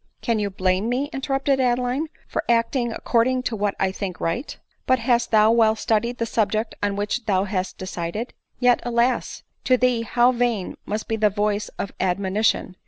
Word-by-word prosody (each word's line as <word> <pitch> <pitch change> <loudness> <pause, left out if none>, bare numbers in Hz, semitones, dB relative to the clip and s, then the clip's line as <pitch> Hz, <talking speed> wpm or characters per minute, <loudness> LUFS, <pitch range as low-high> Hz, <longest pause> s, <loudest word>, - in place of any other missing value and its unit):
" - - -47
Can 230 -2 +1
you 205 -1 -1
blame 190 +2 0
me," 270 +4 -1
interrupted 270 0 0
Adeline, 250 +4 +1
" - - -33
for - - -2
act 230 +2 +2
ing 240 -3 0
according 250 +3 +1
to 240 - -2
what 205 -1 -1
I 190 -1 +1
think 190 -1 -5
right 205 - -3
?" - - -41
" - - -47
But 260 - +4
hast 240 0 +1
thou 215 0 +5
well 225 -1 +4
studied 235 +2 0
the 230 - -1
subject 220 0 0
on 205 -1 0
which 210 +3 -2
thou 190 -2 +2
hast 190 -2 -3
decided? 185 +5 -4 0.3
Yet, 245 -1 +4
alas! 240 +1 0 0.2
to 255 - +4
thee 250 -2 +2
how 240 +2 +3
vain 240 -6 -1
must 210 +1 -3
be 225 - -1
the 215 -1 +3
voice 205 +1 -1
of 200 - -4
admonition! 190 +1 0
225 Hz, 200 wpm, -23 LUFS, 205-245 Hz, 0.3 s, thou